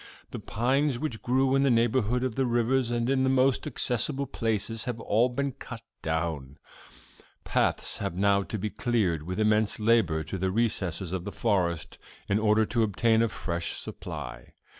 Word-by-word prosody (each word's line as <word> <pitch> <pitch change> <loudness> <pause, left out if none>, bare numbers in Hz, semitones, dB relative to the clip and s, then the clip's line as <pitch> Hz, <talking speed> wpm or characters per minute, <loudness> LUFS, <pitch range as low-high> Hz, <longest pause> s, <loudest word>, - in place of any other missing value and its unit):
The - - -5
pines 130 +4 0
which 125 -5 -4
grew 130 +2 +2
in 135 - +3
the 140 - +3
neighborhood 120 0 +2
of 130 -3 -1
the 130 +2 0
rivers 120 +1 +1
and 120 0 0
in 130 0 +2
the 130 - +2
most 130 +1 +2
accessible 135 +1 0
places 115 -3 -2
have 120 -2 -3
all 115 +3 +2
been 140 +3 -2
cut 115 -2 -9 0.2
down. 80 -4 -3 0.9
Paths - - 0
have 85 - -3
now 100 +1 +3
to 110 - -4
be 105 +1 -3
cleared 105 -10 0
with 90 +6 -5
immense 105 0 +2
labor 105 -8 +2
to 95 +4 -5
the 95 +1 0
recesses 95 -5 -1
of 95 -2 -2
the - - -5
forest, 90 -7 -1 0.3
in 100 +1 +2
order 110 0 +3
to 115 +2 0
obtain 110 +1 +2
a 115 - +2
fresh 85 -4 -3
supply. - - -7
115 Hz, 175 wpm, -28 LUFS, 95-125 Hz, 0.9 s, in